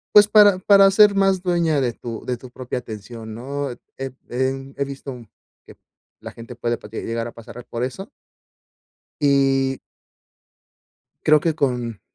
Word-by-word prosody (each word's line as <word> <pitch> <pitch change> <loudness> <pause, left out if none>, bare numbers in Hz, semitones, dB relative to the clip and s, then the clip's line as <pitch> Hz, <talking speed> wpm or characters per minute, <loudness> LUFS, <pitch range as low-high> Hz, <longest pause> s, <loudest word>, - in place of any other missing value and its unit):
pues, 205 0 +9
para 205 -3 +6
para 195 +1 +6
ser 205 +1 +6
más 195 -2 +2
dueña 170 -5 +1
de 120 -3 0
tu 115 -1 -8
de 125 -1 -2
tu 125 +2 -12
propia 125 0 -5
atención, 110 0 -9
¿no?, 140 +4 -4 0.3
he 135 0 -5 0.2
he 135 +2 -2
visto 135 0 -7 0.5
que - - -15 0.4
la - - -9
gente, 115 +1 -11
puede 120 0 -2
llegar 115 +1 -3
a - - -8
pasar 115 +1 -11
por 120 +1 -4
eso 130 - -5 1.1
y 135 -2 +2 1.5
creo 155 0 +6
que 165 0 +1
con 125 -7 -2
135 Hz, 145 wpm, -22 LUFS, 120-165 Hz, 1.5 s, pues